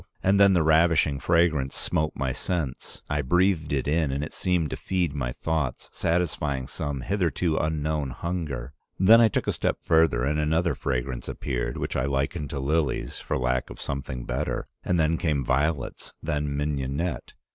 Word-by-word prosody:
And 100 Hz, +1 st, +4 dB
then 100 Hz, -1 st, +7 dB
the 85 Hz, -3 st, +3 dB
ravishing 80 Hz, -2 st, +4 dB
fragrance 80 Hz, -5 st, +2 dB
smote 75 Hz, 0 st, -1 dB
my 65 Hz, -2 st, -1 dB
sense. 80 Hz, -7 st, -4 dB
I 75 Hz, 0 st, 0 dB
breathed 90 Hz, +2 st, +2 dB
it 70 Hz, -2 st, 0 dB
in 75 Hz, -1 st, +1 dB
and 70 Hz, +2 st, -2 dB
it 75 Hz, -, -6 dB
seemed 90 Hz, -5 st, 0 dB
to -, -, -2 dB
feed 90 Hz, -5 st, -1 dB
my 65 Hz, -4 st, -2 dB
thoughts, 80 Hz, -3 st, -2 dB
satisfying 75 Hz, -6 st, 0 dB
some 70 Hz, 0 st, -4 dB
hitherto 90 Hz, -1 st, 0 dB
unknown 75 Hz, -2 st, -1 dB
hunger. 75 Hz, -4 st, -4 dB, 0.2 s
Then 110 Hz, +5 st, +7 dB
I 115 Hz, -, +7 dB
took 105 Hz, -, -1 dB
a -, -, +1 dB
step -, -, -1 dB
further 80 Hz, -7 st, +3 dB
and 75 Hz, +3 st, +1 dB
another 80 Hz, +3 st, +1 dB
fragrance 65 Hz, -1 st, -3 dB
appeared, -, -, -3 dB
which -, -, -3 dB
I 65 Hz, -, +1 dB
liken 70 Hz, +3 st, -1 dB
to 70 Hz, -, -4 dB
lilies 75 Hz, +1 st, -1 dB
for -, -, -2 dB
lack 65 Hz, 0 st, 0 dB
of -, -, -10 dB
something 65 Hz, -3 st, -4 dB
better, -, -, -2 dB, 0.2 s
and 90 Hz, -, +1 dB
then 80 Hz, +1 st, +2 dB
came 75 Hz, -6 st, 0 dB
violets, 70 Hz, +1 st, -1 dB
then 75 Hz, -2 st, -1 dB
mignonette. 70 Hz, +1 st, -2 dB
75 Hz, 170 wpm, -26 LUFS, 70-85 Hz, 0.2 s, then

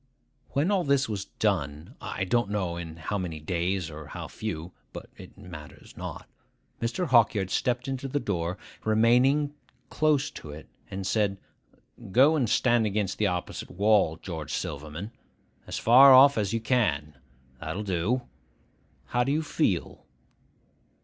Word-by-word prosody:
When 150 Hz, +8 st, +1 dB
all 195 Hz, -3 st, +2 dB
this 140 Hz, -2 st, +2 dB
was 100 Hz, -3 st, -4 dB
done,—I 80 Hz, -4 st, -3 dB
don't 110 Hz, +3 st, +1 dB
know 95 Hz, -5 st, -2 dB
in 80 Hz, -2 st, -7 dB
how 100 Hz, +6 st, -3 dB
many 85 Hz, -4 st, -4 dB
days 90 Hz, +2 st, -2 dB
or 75 Hz, -1 st, -9 dB
how -, -, -7 dB
few, 85 Hz, -5 st, -5 dB, 0.2 s
but -, -, -9 dB
it -, -, -13 dB
matters 85 Hz, -7 st, -12 dB
not,—Mr. 120 Hz, +9 st, -6 dB
Hawkyard 110 Hz, -6 st, +3 dB
stepped 125 Hz, 0 st, 0 dB
in 135 Hz, -1 st, -2 dB
at 135 Hz, -, -4 dB
the 145 Hz, -, +1 dB
door, 90 Hz, -5 st, -2 dB, 0.3 s
remaining 125 Hz, +7 st, +3 dB, 0.4 s
close 150 Hz, -2 st, +2 dB
to 75 Hz, -, -10 dB
it, 75 Hz, +2 st, -10 dB, 0.2 s
and 95 Hz, 0 st, -5 dB
said, 100 Hz, 0 st, +1 dB, 0.7 s
'Go 135 Hz, +9 st, +5 dB
and 130 Hz, -8 st, +1 dB
stand 120 Hz, -3 st, +3 dB
against 100 Hz, -2 st, -2 dB
the 105 Hz, -, +3 dB
opposite 90 Hz, -2 st, -4 dB
wall, 100 Hz, -4 st, +2 dB
George 80 Hz, -6 st, -6 dB
Silverman. 75 Hz, +8 st, -5 dB, 0.6 s
As -, -, -4 dB
far 130 Hz, +3 st, +8 dB
off 140 Hz, +2 st, +8 dB
as 105 Hz, -3 st, 0 dB
you 115 Hz, 0 st, -1 dB
can. 75 Hz, -, 0 dB, 0.4 s
That'll 105 Hz, -, -4 dB
do. 105 Hz, +7 st, 0 dB, 0.8 s
How 125 Hz, -, +1 dB
do 135 Hz, -, -1 dB
you 155 Hz, +2 st, +1 dB
feel? 105 Hz, -, -1 dB
105 Hz, 145 wpm, -27 LUFS, 85-125 Hz, 0.8 s, far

